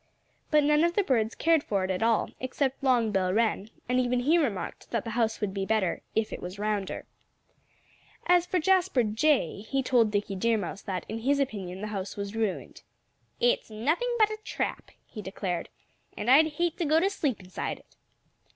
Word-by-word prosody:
But 300 Hz, -1 st, +4 dB
none 300 Hz, +2 st, +4 dB
of 340 Hz, 0 st, +2 dB
the 410 Hz, -, +3 dB
birds 230 Hz, -, +1 dB
cared 325 Hz, -2 st, +3 dB
for 195 Hz, -2 st, -1 dB
it 185 Hz, -, -1 dB
at 185 Hz, -, -2 dB
all, 225 Hz, -1 st, +2 dB
except 265 Hz, +1 st, -2 dB
Long 245 Hz, -5 st, +3 dB
Bill 185 Hz, -2 st, +1 dB
Wren; 220 Hz, 0 st, +1 dB, 0.2 s
and 250 Hz, +1 st, +2 dB
even 250 Hz, 0 st, +1 dB
he 315 Hz, +7 st, +4 dB
remarked 230 Hz, -, -3 dB
that 230 Hz, -3 st, -1 dB
the 230 Hz, -, -5 dB
house 225 Hz, -1 st, 0 dB
would 205 Hz, -3 st, -2 dB
be 195 Hz, -1 st, -2 dB
better 195 Hz, -3 st, 0 dB
"if 220 Hz, -1 st, 0 dB
it -, -, -6 dB
was 180 Hz, +2 st, -7 dB
rounder." 205 Hz, -2 st, -2 dB, 1.2 s
As 355 Hz, 0 st, +4 dB
for 370 Hz, -, 0 dB
Jasper 365 Hz, -6 st, +3 dB
Jay, 220 Hz, -, +1 dB
he 270 Hz, +5 st, -1 dB
told 240 Hz, -4 st, +3 dB
Dickie 205 Hz, -1 st, -2 dB
Deer 230 Hz, +4 st, +2 dB
Mouse 200 Hz, 0 st, -5 dB
that, 185 Hz, -3 st, -4 dB
in 225 Hz, -, -4 dB
his 280 Hz, +5 st, +1 dB
opinion, 195 Hz, -8 st, -3 dB
the 215 Hz, -, -4 dB
house 195 Hz, 0 st, -4 dB
was 200 Hz, +1 st, -5 dB
ruined. 220 Hz, -4 st, -3 dB, 0.6 s
"It's -, -, +2 dB
nothing 310 Hz, -, 0 dB
but 435 Hz, -1 st, +4 dB
a 430 Hz, -, -5 dB
trap," -, -, -3 dB, 0.2 s
he 215 Hz, -, -8 dB
declared. 190 Hz, -2 st, -4 dB, 0.5 s
"And 240 Hz, -, +1 dB
I'd 310 Hz, +3 st, +6 dB
hate 345 Hz, +2 st, -1 dB
to 340 Hz, -, 0 dB
go 310 Hz, +2 st, +4 dB
to 370 Hz, -, +2 dB
sleep 290 Hz, -, -1 dB
inside 185 Hz, -2 st, -5 dB
it." -, -, -23 dB
230 Hz, 195 wpm, -28 LUFS, 205-300 Hz, 1.2 s, I'd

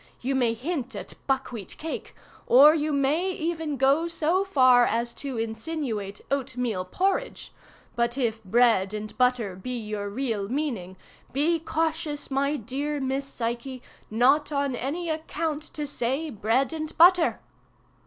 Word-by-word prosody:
You 265 Hz, +3 st, -1 dB
may 240 Hz, -3 st, +2 dB
hint 265 Hz, +1 st, -4 dB
at -, -, -7 dB
buck 270 Hz, -1 st, 0 dB
wheat 220 Hz, -6 st, -7 dB
cake, 320 Hz, +1 st, -6 dB, 0.3 s
or 285 Hz, +5 st, +8 dB
you 310 Hz, -1 st, 0 dB
may 290 Hz, +6 st, +1 dB
even 320 Hz, -3 st, -2 dB
go 275 Hz, +6 st, +3 dB
so 335 Hz, +3 st, +1 dB
far 255 Hz, -9 st, +5 dB
as 235 Hz, +1 st, 0 dB
to 275 Hz, -4 st, -4 dB
insinuate 225 Hz, -3 st, -4 dB
oat 265 Hz, -2 st, -2 dB
meal 220 Hz, -7 st, -1 dB
porridge, 390 Hz, -, -1 dB, 0.4 s
but 235 Hz, +1 st, 0 dB
if 225 Hz, -4 st, -1 dB
bread 215 Hz, -1 st, +3 dB
and 215 Hz, 0 st, -6 dB
butter 250 Hz, -6 st, +2 dB
be 245 Hz, +7 st, -4 dB
your 210 Hz, -2 st, -4 dB
real 215 Hz, -3 st, -2 dB
meaning, 235 Hz, -10 st, -3 dB, 0.4 s
be 320 Hz, +5 st, +2 dB
cautious, 315 Hz, -2 st, -2 dB
my 280 Hz, +2 st, +1 dB
dear 285 Hz, +5 st, -3 dB
Miss 270 Hz, +1 st, -2 dB
Psyche, 245 Hz, +1 st, -4 dB, 0.3 s
not 265 Hz, +8 st, +3 dB
on 280 Hz, -2 st, 0 dB
any 295 Hz, +8 st, -3 dB
account 315 Hz, -1 st, -2 dB
to 300 Hz, -, -2 dB
say 280 Hz, +3 st, -2 dB
'bread 230 Hz, +7 st, +1 dB
and 310 Hz, -1 st, -5 dB
butter! 350 Hz, 0 st, +6 dB
270 Hz, 145 wpm, -26 LUFS, 235-310 Hz, 0.4 s, or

